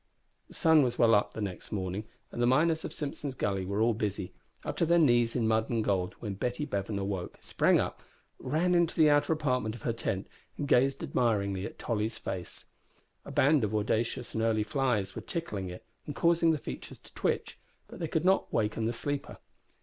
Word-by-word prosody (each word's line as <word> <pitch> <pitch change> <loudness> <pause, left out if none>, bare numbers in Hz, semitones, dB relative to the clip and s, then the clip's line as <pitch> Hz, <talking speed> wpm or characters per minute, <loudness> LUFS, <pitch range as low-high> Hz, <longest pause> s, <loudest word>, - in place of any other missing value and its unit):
The - - -14
sun 160 -3 +5
was 125 -3 0
well 115 -1 +5
up 105 - +2
next 100 -4 -5
morning, 95 0 -3 0.3
and 120 - -4
the 120 - +4
miners 160 +5 +3
of - - -5
Simpson's 145 -2 -4
Gully 95 -5 -1
were 100 +2 -1
all 115 +1 +4
busy, 100 -3 -3 0.3
up - - -3
to - - +3
their 170 +1 +5
knees 120 -7 +4
in 115 -3 +1
mud 110 0 +1
and 115 -2 0
gold, 95 -3 0
when 105 -4 -4
Betty 125 +8 -2
Bevan 100 -5 -3
awoke, 95 -2 -3
sprang - - +2
up, - - -3 0.4
ran 175 +4 +1
into 170 -1 +2
the 155 -2 +5
outer 145 +2 +3
apartment 125 -8 0
of 120 - -12
her 115 - 0
tent, 95 -4 -3 0.3
and 145 - -3
gazed 135 +1 +3
admiringly 100 -5 0
at - - -12
Tolly's 110 -1 -2
face. 90 -2 -6 0.6
A - - -8
band 145 -1 +4
of 105 0 -1
audacious 115 +3 -1
and 110 - -1
early 110 -1 +2
flies 110 -5 0
were - - -4
tickling 105 - -4
it, 90 - -9 0.2
and 145 - -5
causing 170 0 +3
the 160 - +3
features 65 - -7
to - - -17
twitch, - - -2 0.3
but - - -11
they 165 - -2
could 160 +2 -1
not 190 +1 +3
waken 110 +1 0
the 115 - 0
sleeper. 145 +4 -3
115 Hz, 205 wpm, -30 LUFS, 105-145 Hz, 0.6 s, sun